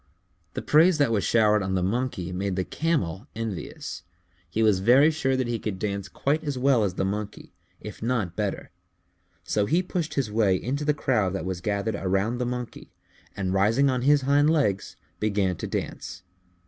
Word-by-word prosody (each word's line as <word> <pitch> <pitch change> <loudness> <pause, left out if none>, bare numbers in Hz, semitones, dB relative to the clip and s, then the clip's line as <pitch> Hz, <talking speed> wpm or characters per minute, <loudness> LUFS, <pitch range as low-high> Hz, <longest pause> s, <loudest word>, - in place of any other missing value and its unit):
The - - -3
praise 160 +3 +5
that 145 -6 +2
was 105 -3 +1
showered 105 -2 +3
on 95 0 -1
the 90 - 0
Monkey 100 -3 -2
made 95 +1 -2
the 95 - 0
Camel 125 - -2
envious. 110 -5 -5 0.5
He 110 +6 0
was 105 -4 +4
very 130 +10 +5
sure 135 -4 0
that 130 - 0
he 120 -1 -2
could 105 -3 -4
dance 100 0 -3
quite 150 - -1
as 145 -4 -3
well 130 -3 +3
as 95 -3 -1
the 95 - 0
Monkey, 105 +2 -5 0.3
if - - -9
not 110 -7 -1
better, 105 -2 -3 0.7
so 105 -1 0
he 175 - +2
pushed 165 -4 -3
his 130 -7 -1
way 105 -3 +3
into 135 +9 -2
the 150 0 +1
crowd 110 -10 +1
that 90 -3 -3
was 95 -1 -4
gathered 105 +2 -1
around 100 +5 -1
the 125 - -1
Monkey, 125 -1 -6 0.5
and 95 -2 -1
rising 115 +8 +3
on 125 -1 -1
his 145 +2 +4
hind 145 +3 +3
legs, 135 -12 0 0.2
began 100 -3 0
to - - -5
dance. 90 0 -5
110 Hz, 185 wpm, -26 LUFS, 95-135 Hz, 0.7 s, praise